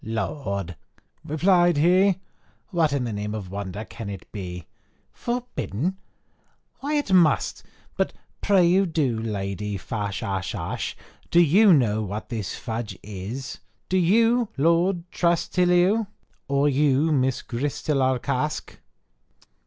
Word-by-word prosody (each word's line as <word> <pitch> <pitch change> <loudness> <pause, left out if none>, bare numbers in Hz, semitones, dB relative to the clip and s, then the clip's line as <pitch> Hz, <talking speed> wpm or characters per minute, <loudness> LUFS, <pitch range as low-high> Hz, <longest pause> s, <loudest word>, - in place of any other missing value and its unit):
"Lord!" 100 - -3 0.5
replied 175 +2 +3
he, 185 +5 +4 0.6
"what 165 -5 +2
in 140 -2 0
the 115 -3 -3
name 105 +1 -3
of 95 -4 -6
wonder 100 +1 -5
can 115 -3 -8
it 100 -2 -8
be? 90 -5 -6 0.5
Forbidden! 190 - -3 0.8
why 290 +2 -2
it 290 -10 0
must, 170 -6 +3 0.4
but - - +1 0.3
pray 190 -1 +4
do 160 -4 0
you, 120 -5 0
Lady 105 -1 -3
Fashashash, 100 -1 -3 0.3
do 170 - +4
you 185 +6 +6
know 115 -9 +3
what 105 +1 -5
this 110 -6 -4
fudge 110 -5 -5
is? 105 +7 -6 0.3
Do 185 - +2
you, 225 +6 +3
Lord 170 +4 +2
Trastillauex? 180 +4 +2 0.4
or 140 +1 +2
you, 145 +2 +3
Miss 130 -3 +1
Gristilarkask? 130 0 -1
140 Hz, 115 wpm, -24 LUFS, 105-175 Hz, 0.8 s, you